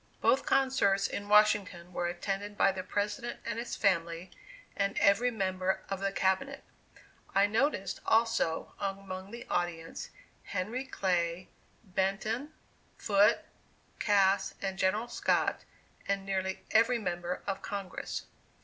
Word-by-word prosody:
Both 265 - +3
concerts 205 -8 +3
in 205 0 -5
Washington 205 -4 +3
were 175 0 -1
attended 195 +4 -3
by 195 - +5
the 190 -1 -4
President 210 +6 -2
and 230 0 -2
his 235 - -4
family, 170 -2 0 0.4
and 200 0 0
every 210 +5 +4
member 190 -4 -1
of 195 - -1
the 195 0 0
Cabinet. 195 +10 0 0.7
I 195 +1 +6
noticed, 210 -3 0
also, 225 -7 +2
among 195 -1 -4
the 235 +2 -8
audience, 170 -2 -3 0.3
Henry 215 +8 -3
Clay, 180 -6 -1 0.3
Benton, 210 +8 -1 0.5
Foote, 205 0 +4 0.6
Cass 200 -2 +3
and 190 -1 -3
General 210 +5 +1
Scott, - - +1 0.5
and 195 -1 0
nearly 190 -1 -2
every 230 +3 +4
member 175 -4 -3
of 195 -1 -3
Congress. 200 -2 -5
195 Hz, 120 wpm, -31 LUFS, 185-215 Hz, 0.7 s, I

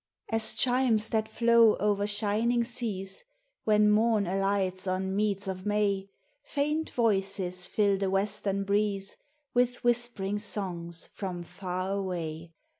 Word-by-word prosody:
As 225 0 +3
chimes 245 -4 +2
that 220 -1 0
flow 230 -1 +4
o'er 205 0 +1
shining 215 +3 +1
seas 220 -6 -4 0.4
When 210 -1 +4
Morn 215 -1 +3
alights 195 0 0
on 190 +1 -1
meads 200 -1 0
of 185 -1 -4
May, 200 -2 0 0.3
Faint 300 +2 -1
voices 195 -5 0
fill 200 -1 +1
the 195 -1 0
western 200 0 0
breeze 200 -1 -1 0.4
With 245 0 +2
whisp'ring 235 -4 0
songs 175 -5 -4
from 180 -3 -5
Far 185 +1 -4
Away. 170 -4 -4
200 Hz, 120 wpm, -29 LUFS, 190-220 Hz, 0.4 s, flow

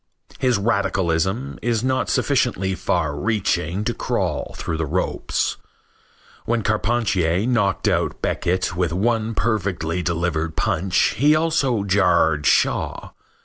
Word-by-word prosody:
His 125 -4 +2
radicalism 100 +2 0
is 115 -1 0
not 130 0 0
sufficiently 95 +1 +1
far 80 -5 -1
reaching 90 0 -1
to 120 +1 -1
crawl - - -2
through 80 - -3
the 80 - -1
ropes. 90 +6 -1 0.9
When 115 -1 0
Carpentier 105 -5 +1
knocked 115 -6 +1
out - - 0
Beckett 90 -1 -1
with 90 -2 0
one 115 +3 0
perfectly 95 -6 -1
delivered 85 -2 -1
punch 90 +3 +1
he 150 +3 +5
also 155 -9 +1
jarred 90 -6 +2
Shaw. - - +1
95 Hz, 115 wpm, -22 LUFS, 85-115 Hz, 0.9 s, he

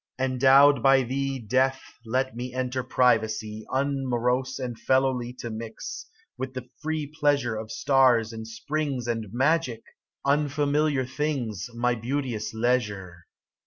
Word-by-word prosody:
Endowed 135 +1 +5
by 135 0 +5
thee, 135 +2 -2
Death, 130 +3 +1 0.3
let 130 +2 0
me 125 +1 -5
enter 130 0 -1
privacy, 110 -4 +1
Unmorose 130 -2 0
and 125 -3 -4
fellowly 130 -2 +1
To 120 - -6
mix, 110 0 -7 0.3
with 130 0 -4
the 130 -1 -6
free 155 0 -2
pleasure 145 -5 0
Of 110 0 -6
stars 130 -5 +3
and 110 0 -7
springs 135 +2 -3
And 115 -4 -3
magic, 130 -2 +1 0.4
unfamiliar 145 0 +1
things, 130 -5 -3
My 125 +1 +1
beauteous 120 -1 -3
leisure. 105 -7 -1
130 Hz, 125 wpm, -26 LUFS, 115-135 Hz, 0.4 s, Endowed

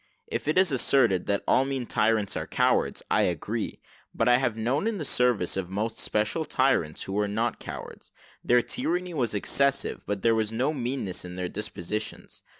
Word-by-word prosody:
If - - -4
it 155 - +1
is 185 -3 +5
asserted 120 -8 +3
that 100 -1 0
all 130 - +4
mean 135 -2 -3
tyrants 110 -3 +1
are - - -3
cowards, - - +1
I - - +4
agree: - - -2 0.4
but 115 - +1
I 120 0 +6
have 120 -4 -1
known 130 - 0
in 225 -2 -1
the 155 - -4
service 125 -9 +2
most 95 +4 -3
special 110 +10 0
tyrants, 130 - +1
who 95 - -6
were 105 +1 +1
not 110 +4 -1
cowards: - - -9 0.3
their 120 0 +4
tyranny 180 +1 -2
was 120 -8 0
excessive, 140 +7 +1
but 100 -2 -3
there 115 - +4
was 110 -1 0
no 130 +7 0
meanness 125 - -3
in 90 0 -8
there 90 -1 -3
dispositions. 105 0 -5
115 Hz, 180 wpm, -27 LUFS, 105-135 Hz, 0.4 s, I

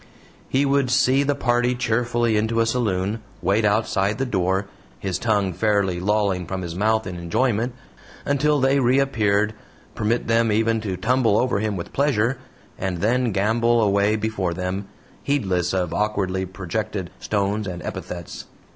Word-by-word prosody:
He 135 +2 +2
would 140 -2 +2
"see" 130 +1 +3
the 145 0 +1
party 120 -1 +1
cheerfully 120 -1 0
into 110 +2 +1
a 115 - +4
saloon, 110 -3 -1 0.2
wait 105 +3 +1
outside 105 -1 +1
the 135 - -1
door 95 -3 0 0.3
his 95 -2 -3
tongue 100 -5 +1
fairly 100 -3 +1
lolling 100 -2 0
from 95 +1 -4
his 85 -1 -5
mouth 110 +4 +1
in 90 -2 -5
enjoyment 115 +7 0 0.5
until 145 +1 +2
they 135 +1 +3
reappeared, 115 -5 +2 0.4
permit 115 +3 0
them 115 0 +3
even 115 +1 +1
to 95 -4 -3
tumble 120 -2 +2
over 125 -5 +1
him 105 -2 -1
with 85 - -7
pleasure, 135 -3 +1 0.4
and 95 -2 -2
then 120 +5 +1
gambol 115 +4 +2
away 100 0 +3
before 105 -5 -2
them, 95 +2 -3 0.3
heedless 95 - 0
of 90 -3 -1
awkwardly 95 -3 -1
projected 95 0 -4
stones 100 0 -1
and 90 -1 -6
epithets. 85 -2 -6
110 Hz, 150 wpm, -23 LUFS, 95-120 Hz, 0.5 s, a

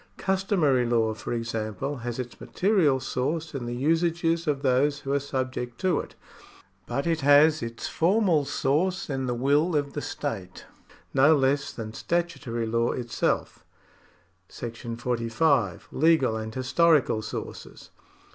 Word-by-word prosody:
Customary 190 -9 +1
law, 115 -2 +2
for 110 - -7
example, 115 +3 -3
has 120 -1 -5
its 125 -2 -7
material 180 -9 +2
source 155 +6 -2
in 130 -4 -4
the 120 - -3
usages 165 +4 +1
of 145 -1 0
tiiose 140 +2 +2
who 135 0 -3
are 140 - +2
subject 130 -3 -4
to 185 -5 +1
it; - - -8 0.7
but 140 - -2
it 165 -2 0
has 145 +2 +5
its 115 0 -5
formal 180 -3 +2
source 170 +7 0
in 135 -1 -2
the 125 - -1
will 145 +7 +2
of 145 -1 -1
the 145 - -3
state, 100 -14 -5 0.5
no 140 +4 +6
less 140 0 +1
than 110 -2 -7
statutory 140 -10 -2
law 115 +1 +1
itself. 120 -2 -2 0.9
§ 115 0 -7
45. 120 - 0
Legal 150 -6 +3
and 110 0 -5
Historical 130 -2 +3
Sources. - - -8
135 Hz, 135 wpm, -26 LUFS, 120-160 Hz, 0.9 s, no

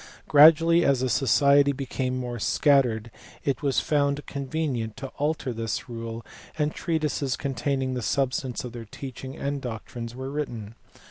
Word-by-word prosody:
Gradually, 165 +3 +7
as 135 -4 +3
the 130 - 0
society 140 +3 +4
became 130 -1 -3
more 120 -2 -4
scattered, 120 -4 +2 0.3
it 135 -3 0
was 140 -3 +2
found 145 -1 0
convenient 135 -5 -3
to 135 - -6
alter 145 -3 -1
this 115 -1 -3
rule, 115 -1 -6 0.3
and 150 0 0
treatises 150 -5 -1
containing 135 -1 -1
the 125 - -2
substance 130 0 -1
of 125 - -6
their 115 -1 -8
teach 130 +4 -9
ing 130 0 -7
and 140 0 -3
doctrines 115 0 -6
were 130 +1 -5
written. 120 -8 -4
135 Hz, 150 wpm, -26 LUFS, 120-145 Hz, 0.3 s, Gradually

